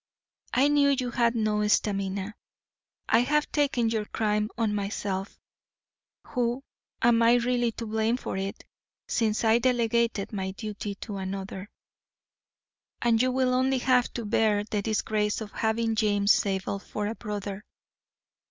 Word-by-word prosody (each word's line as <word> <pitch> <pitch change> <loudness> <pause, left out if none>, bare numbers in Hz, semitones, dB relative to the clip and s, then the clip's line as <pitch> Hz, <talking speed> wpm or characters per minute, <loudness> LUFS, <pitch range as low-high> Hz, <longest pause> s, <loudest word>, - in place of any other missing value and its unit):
I 270 +3 +5
knew 290 -1 +4
you 255 -3 0
had 235 -1 +2
no 210 -2 +1
stamina. 200 -1 0 0.7
I 225 - +4
have 300 +5 +1
taken 265 -6 +1
your 220 -2 -1
crime 210 0 0
on 220 -2 +1
myself, 200 -1 -3 0.9
who 245 +2 -1 0.4
am 235 0 +5
really 240 0 +3
to 230 - -6
blame 220 +2 0
for - - -5
it, 195 +1 -4 0.4
since 220 -2 0
I 225 +1 +4
delegated 235 -4 +1
my 190 -2 -3
duty 210 -1 -5
to 205 -4 -5
another, 190 +1 -5 1.3
and 230 -1 +3
you 255 0 +2
will 255 0 +1
only 260 +1 +2
have 250 -1 +2
to 235 - -4
bear 210 -1 +2
the 210 -1 -2
disgrace 210 0 0
of 215 -2 -7
having 225 0 0
James 205 -2 +2
Zabel 195 0 0
for 210 +1 -5
a 215 - -2
brother. 205 -2 -5
220 Hz, 140 wpm, -27 LUFS, 205-240 Hz, 1.3 s, I